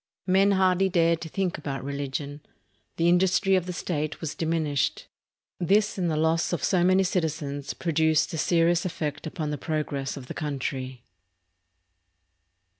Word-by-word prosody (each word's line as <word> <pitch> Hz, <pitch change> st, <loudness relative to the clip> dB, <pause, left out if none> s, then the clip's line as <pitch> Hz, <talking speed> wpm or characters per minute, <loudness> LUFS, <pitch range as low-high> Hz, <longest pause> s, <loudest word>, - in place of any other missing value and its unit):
Men 195 Hz, +2 st, +4 dB
hardly 190 Hz, 0 st, +3 dB
dared 170 Hz, -2 st, +2 dB
to 160 Hz, -, -6 dB
think 185 Hz, -1 st, -2 dB
about 135 Hz, -3 st, -4 dB
religion. 140 Hz, +1 st, -4 dB, 0.6 s
The 170 Hz, -, +2 dB
industry 190 Hz, +2 st, +3 dB
of 185 Hz, -1 st, 0 dB
the -, -, -2 dB
state 160 Hz, -3 st, -3 dB
was 160 Hz, -3 st, -4 dB
diminished. 160 Hz, -4 st, -1 dB, 0.5 s
This 205 Hz, +4 st, +2 dB
and 180 Hz, -3 st, 0 dB
the 155 Hz, -, 0 dB
loss 160 Hz, +1 st, +1 dB
of 175 Hz, -, -2 dB
so 180 Hz, -3 st, +2 dB
many 185 Hz, +2 st, +4 dB
citizens 150 Hz, -6 st, -2 dB
produced 160 Hz, -2 st, +1 dB
a -, -, -2 dB
serious 170 Hz, +1 st, +3 dB
effect 150 Hz, -5 st, -4 dB
upon 155 Hz, -1 st, -4 dB
the 145 Hz, -, -4 dB
progress 145 Hz, -3 st, -3 dB
of 135 Hz, -, -8 dB
the -, -, -7 dB
country. 130 Hz, -4 st, -4 dB
160 Hz, 150 wpm, -26 LUFS, 145-180 Hz, 0.6 s, Men